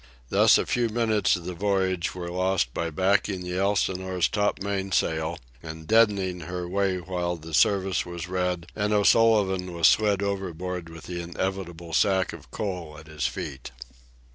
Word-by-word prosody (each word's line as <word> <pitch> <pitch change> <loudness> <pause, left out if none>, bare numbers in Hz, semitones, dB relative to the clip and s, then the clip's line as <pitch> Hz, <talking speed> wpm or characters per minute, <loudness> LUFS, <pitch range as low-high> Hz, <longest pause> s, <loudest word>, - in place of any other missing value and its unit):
Thus - - +6
a - - 0
few 120 -1 0
minutes 110 -2 +2
of 85 -2 -7
the 90 - -4
voyage 95 -1 0
were 85 -1 -5
lost 90 -8 0
by 85 0 -2
backing 95 +3 +1
the 90 +1 -3
Elsinore's 95 -2 0 0.3
main 100 -1 -2
topsail 80 -2 0 0.2
and 80 -1 -8
deadening 100 -4 +3
her 90 +2 -5
way 95 0 0
while 90 -1 -3
the 80 0 -11
service 95 +3 +3
was 85 0 -6
read 90 -2 -1
and 105 0 0
O'Sullivan 100 -4 +3
was 85 - +2
slid 105 -2 +3
overboard 90 -3 -3
with 80 -1 -11
the 90 -1 -5
inevitable 85 -1 -4
sack 95 -1 +2
of - - -12
coal 90 -7 -5
at 75 - -12
his 75 -4 -2
feet. 60 - -6
90 Hz, 160 wpm, -26 LUFS, 85-100 Hz, 0.3 s, Thus